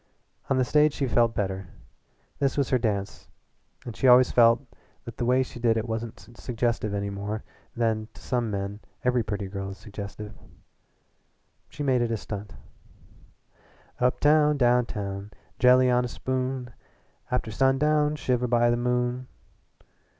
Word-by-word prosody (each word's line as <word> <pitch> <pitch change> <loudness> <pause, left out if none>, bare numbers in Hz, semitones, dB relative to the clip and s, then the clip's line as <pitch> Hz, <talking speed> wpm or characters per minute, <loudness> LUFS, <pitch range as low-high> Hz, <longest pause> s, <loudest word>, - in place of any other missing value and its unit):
On 135 - +2
the 130 - +2
stage 150 +2 +3
she 140 - -1
felt 115 -2 +2
better. 95 -2 -2 0.7
This 140 0 0
was 140 -3 0
her 130 - +3
dance 100 -4 -3 0.6
and 120 - -7
she 135 - +1
always 125 0 +7
felt 115 +2 +5 0.4
that 115 -1 -9
the 120 - -1
way 130 +2 +3
she 125 - -10
did 115 -1 +2
it 110 +2 -2
wasn't 110 -1 -6
suggestive 115 -3 -1
any 100 0 -2
more 100 +2 -4 0.3
than 110 -2 0
to - - -13
some 120 -3 -1
men 100 0 -4 0.2
every 125 -1 +2
pretty 105 -2 -4
girl 95 0 -5
is 95 - -8
suggestive. 105 0 -8 1.4
She 145 - -6
made 130 -3 +2
it 120 - 0
a 115 - -1
stunt. 105 -1 -7 1.4
"Uptown, 150 +4 +3
downtown, 105 -6 0 0.3
jelly 125 0 +5
on 125 0 +3
a - - -2
spoon, 130 0 -3 0.6
After 125 -2 -1
sundown 150 +5 +2
shiver 125 -4 0
by 120 0 +3
the 120 - +1
moon." 125 +1 -1
120 Hz, 150 wpm, -26 LUFS, 105-130 Hz, 1.4 s, always